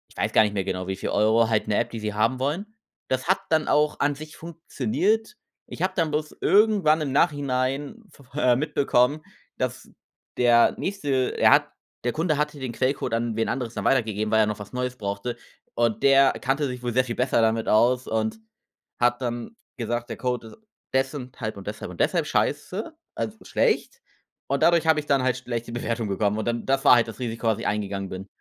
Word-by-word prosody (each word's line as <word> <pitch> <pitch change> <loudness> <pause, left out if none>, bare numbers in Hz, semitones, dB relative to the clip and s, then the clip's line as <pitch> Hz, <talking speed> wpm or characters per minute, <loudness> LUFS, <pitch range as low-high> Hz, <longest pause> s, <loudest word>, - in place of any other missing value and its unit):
weiß - - -1
gar - - +6
nicht 105 -1 -1
mehr 100 -2 -1
genau, 90 -1 -3
wie 95 - -2
viel 95 - -4
Euro 110 +2 +3
halt 110 -2 +1
'ne 105 - +1
App, - - 0
die 115 - -5
sie 105 -1 -3
haben 115 +5 +1
wollen. 150 +9 -1 0.4
Das 130 +2 -1
hat 190 - +3
dann 160 -1 +2
auch 150 0 +2
an 145 0 +1
sich 155 +2 -10
funktioniert. 170 - -1 0.3
Ich - - -9
habe 185 +1 +1
dann 165 -4 +1
bloß 150 0 -3
irgendwann 200 -7 +4
im 145 -3 -2
Nachhinein 140 - 0
v 140 - -18 0.2
äh, 125 -4 +4
mitbekommen, 140 0 +1 0.4
dass 130 -1 -3 0.5
der 120 -1 +5
nächste 145 -10 -1
er - - +5
hat - - +4 0.3
der 120 - 0
Kunde 155 -1 0
hatte 150 0 -2
den 130 -3 -4
Quellcode 130 0 -1
an 115 -1 -1
wen 115 0 0
anderes 120 -3 -3
dann - - -4
weitergegeben, 110 -4 +1
weil 110 - +4
er - - +4
noch 105 0 -3
was 105 0 -9
Neues 125 0 -2
brauchte. 100 +2 -4 0.4
Und 115 -2 +1
der 135 0 +6
kannte 135 +3 -1
sich 125 -1 -6
wohl 120 -1 -3
sehr 130 +2 +3
viel 120 -2 -5
besser 125 -2 +2
damit 110 0 +1
aus 120 +4 +3
und 110 - -1 0.6
hat 120 +1 +2
dann 120 - -4 0.2
gesagt: 120 0 -3
„Der - - -5
Code 125 -2 -2
ist - - -13 0.4
des 135 +1 +1
und 130 -2 -8
halb 110 -4 -4
und 100 - -10
deshalb 105 -3 -6
und 85 - -12
deshalb 170 -4 +2
scheiße“, 185 - -1 0.2
also 220 0 -4
schlecht, 480 0 0 0.5
und - - 0
dadurch 170 -1 +4
habe 160 -1 +4
ich 150 - -6
dann 140 -2 +3
halt 130 -1 +1
schlechte 120 -2 -5
Bewertungen 115 -2 -2
bekommen 100 +1 0
und 110 - -3
dann 120 0 -2
das 135 0 +1
war 125 - +9
halt 120 -1 +3
das 110 -3 -9
Risiko, 115 -2 -4
was 110 -1 +1
ich - - -3
eingegangen 100 -2 -2
bin. 95 +1 -7
125 Hz, 210 wpm, -25 LUFS, 115-145 Hz, 0.6 s, war